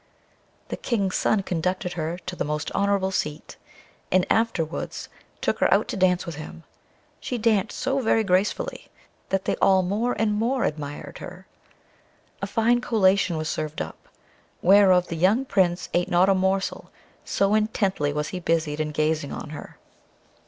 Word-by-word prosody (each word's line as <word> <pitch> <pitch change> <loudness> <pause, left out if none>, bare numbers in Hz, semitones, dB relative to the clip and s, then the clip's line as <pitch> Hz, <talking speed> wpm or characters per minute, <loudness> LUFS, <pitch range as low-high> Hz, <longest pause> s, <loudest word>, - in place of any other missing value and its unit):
The - - -4
King's 200 -6 -1
son 210 -2 +2
conducted 180 0 -2
her 165 +1 -3
to 180 - -5
the - - -2
most 150 +1 -3
honourable 200 -1 +1
seat, 150 -5 -3 0.6
and 185 0 +4
afterwards 175 -8 -1 0.3
took - - 0
her - - +3
out - - +3
to - - -3
dance 180 -2 +2
with 170 -3 -6
him: 160 +1 -9 0.6
she 250 - -3
danced 220 -2 +1
so 270 +1 0
very 225 -3 +2
gracefully, 190 +1 0 0.4
that 195 0 0
they - - +1
all 190 -1 +4
more 215 +7 0
and 210 0 +1
more 235 +4 0
admired 145 -1 -4
her. - - -10 1.0
A 200 - -2
fine 235 +3 +2
collation 195 -6 +2
was 155 0 -3
served 155 0 -3
up, - - -7 0.6
whereof 185 -1 +6
the 170 - -3
young 195 +11 +2
Prince 180 -7 +1
ate 175 0 +1
not 180 +2 +4
a - - +6
morsel, 190 +1 -1 0.3
so 200 +1 +1
intently 200 -8 +1
was 150 +1 -2
he 185 - -4
busied 165 -3 0
in 155 0 -1
gazing 155 -1 -1
on 150 - -6
her. 155 - -9
185 Hz, 160 wpm, -25 LUFS, 165-210 Hz, 1.0 s, whereof